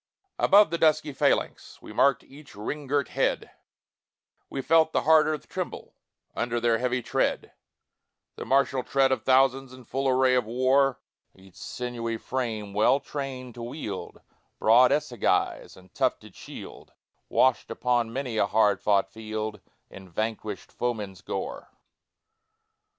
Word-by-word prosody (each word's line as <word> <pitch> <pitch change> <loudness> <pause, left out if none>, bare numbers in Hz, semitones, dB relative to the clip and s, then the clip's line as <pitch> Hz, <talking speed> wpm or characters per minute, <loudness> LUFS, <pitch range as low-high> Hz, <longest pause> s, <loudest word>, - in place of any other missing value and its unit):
Above 200 -3 +5
the 170 - -2
dusky 155 -2 +2
phalanx - - -1
We - - -11
marked 140 -1 +3
each 140 -3 -15
ring 140 +8 -5
girt 140 0 0
head, - - -1 1.0
We 135 - -5
felt 160 -1 +3
the - - +1
hard 160 +1 +5
earth 155 -1 -3
tremble - - -6 0.4
Under 120 0 -1
their 115 -1 +2
heavy 125 0 -1
tread, - - -1 0.8
The - - -6
martial 135 -1 +2
tread 135 +1 +2
of 130 -4 0
thousands 135 0 +2
In 130 0 -13
full 135 +3 -2
array 130 0 +3
of 125 -2 +2
war 130 +2 +2 0.4
Each 95 -1 -18
sinewy 120 -2 -4
frame 110 -5 -4
well 110 +7 +3
trained 135 -4 -6
to 120 - -10
wield 115 -5 -6 0.4
Broad 120 +3 +5
assegai 125 -6 0
and 95 0 -19
tufted - - -1
shield, - - -11 0.4
Washed 130 -2 +2
upon 120 -2 0
many 125 -2 -4
a 100 - +2
hard 105 -1 +2
fought 100 -2 +2
field 110 -2 -5 0.3
In 95 -1 -12
vanquished 110 +2 -4
foeman's 105 -6 -4
gore. - - -5
125 Hz, 140 wpm, -26 LUFS, 110-135 Hz, 1.0 s, Above